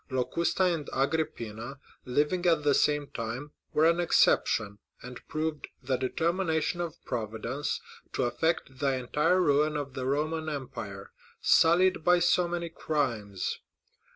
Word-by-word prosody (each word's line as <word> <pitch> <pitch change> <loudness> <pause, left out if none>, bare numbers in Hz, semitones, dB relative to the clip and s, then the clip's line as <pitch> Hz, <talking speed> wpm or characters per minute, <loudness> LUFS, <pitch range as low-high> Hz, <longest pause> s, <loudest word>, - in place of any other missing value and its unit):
Locusta 130 +8 0
and 170 -5 0
Agrippina, 135 -4 -2 0.3
living 150 +8 +1
at 165 -3 +3
the 145 -1 +4
same 145 +1 +2
time, 120 +6 -5 0.2
were 155 +1 +4
an 170 +1 +3
exception, 105 -10 +2 0.2
and 125 0 -9
proved 155 -1 -3 0.2
the 130 +1 0
determination 165 +5 0
of 170 -2 -4
Providence 115 +4 -3 0.3
to - - 0
effect 135 0 -1
the 135 -1 +1
entire 150 +8 +1
ruin 150 -2 +3
of 140 -2 -5
the 130 -1 -3
Roman 155 +3 -1
empire, 105 -9 -6 0.3
sullied 175 +1 +4
by 180 +1 +5
so 175 0 +3
many 170 -1 -3
crimes. 115 - -2
150 Hz, 130 wpm, -29 LUFS, 125-165 Hz, 0.3 s, by